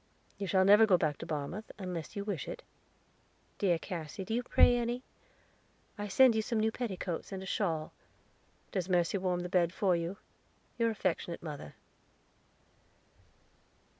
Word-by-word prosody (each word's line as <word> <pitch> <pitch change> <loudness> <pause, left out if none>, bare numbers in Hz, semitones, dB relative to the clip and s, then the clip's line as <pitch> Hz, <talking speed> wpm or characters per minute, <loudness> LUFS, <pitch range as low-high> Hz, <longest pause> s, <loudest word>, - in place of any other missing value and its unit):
You 200 - -2
shall 190 +1 +3
never 210 +3 +7
go 185 -4 +5
back 155 -4 -1
to - - -7
Barmouth, 160 +7 -4
unless 180 -3 -5
you 200 - -2
wish 195 -8 -3
it. - - -6 1.0
Dear 180 -4 +3
Cassy, 170 +1 -6
do 220 - -3
you 240 - +1
pray 245 0 +5
any? 240 +1 -1 0.9
I 205 -1 -4
send 255 +4 +6
you 220 - +1
some 220 +1 -1
new 220 +1 +2
petticoats, 190 -8 -4
and 190 -1 -5
a - - -7
shawl. 165 -5 -1 0.8
Does 185 -3 -2
Mercy 180 +2 +2
warm 180 -1 0
the 180 - -3
bed 175 -2 +2
for 185 -1 +2
you? 170 +3 -3 0.6
Your 230 0 +3
affectionate 185 -5 -2
Mother." 150 -4 -7
190 Hz, 155 wpm, -32 LUFS, 170-215 Hz, 1.0 s, never